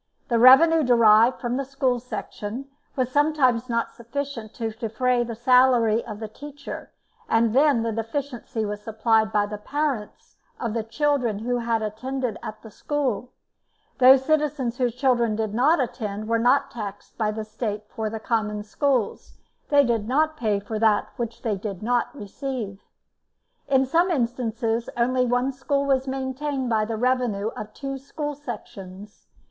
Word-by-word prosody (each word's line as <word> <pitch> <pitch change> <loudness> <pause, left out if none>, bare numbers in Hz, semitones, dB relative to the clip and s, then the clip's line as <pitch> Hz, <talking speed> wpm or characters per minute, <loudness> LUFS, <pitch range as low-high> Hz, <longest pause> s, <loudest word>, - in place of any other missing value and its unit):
The 235 -2 +2
revenue 315 +7 +8
derived 235 -2 +5
from 245 0 -2
the 275 - -1
school 265 -2 0
section 240 0 -6 0.3
was 255 -2 -1
sometimes 265 -5 +2
not 230 -1 -1
sufficient 235 -2 -5
to 225 -2 -3
defray 240 +2 0
the 235 -1 -5
salary 240 -2 +4
of 215 -3 -8
the 220 - -5
teacher, 285 +5 -9 0.4
and 225 -1 +3
then 275 -3 +4
the 230 - -1
deficiency 230 0 -3
was 205 0 -4
supplied 220 0 +1
by 210 -1 +2
the 205 0 -6
parents 275 -2 -3 0.2
of 230 -3 -2
the 230 - 0
children 240 -1 0
who 245 +3 -1
had 230 -1 0
attended 250 +2 -3
at 215 0 -8
the 220 - -11
school; 255 -3 -2 0.7
those 260 +1 +7
citizens 290 -5 0
whose 245 -2 0
children 245 -4 +2
did 215 -1 -2
not 285 +9 +3
attend 215 -5 -3
were 230 0 +1
not 260 +4 +3
taxed 205 -3 -7
by 215 -1 +1
the 215 0 -4
State 215 -1 -4
for 220 0 -4
the 220 +1 -5
Common 210 -2 -1
Schools; 255 0 -1 0.3
they 285 -1 +6
did 230 -3 0
not 310 +5 +2
pay 215 -8 0
for 215 +2 -5
that 215 -2 +3
which 235 -2 -5
they 220 -3 0
did 195 -1 -6
not 240 +1 +1
receive. 220 -3 -5 0.9
In 265 -1 +3
some 335 +7 +2
instances 235 -4 -1
only 250 +1 +2
one 245 +2 +1
school 275 +1 -1
was 270 -1 +1
maintained 265 0 -3
by 215 -1 +2
the 225 0 -3
revenue 240 -4 0
of 215 -1 -8
two 275 -1 -5
school 295 +2 -5
sections. 205 -7 -9
240 Hz, 160 wpm, -24 LUFS, 220-265 Hz, 0.9 s, revenue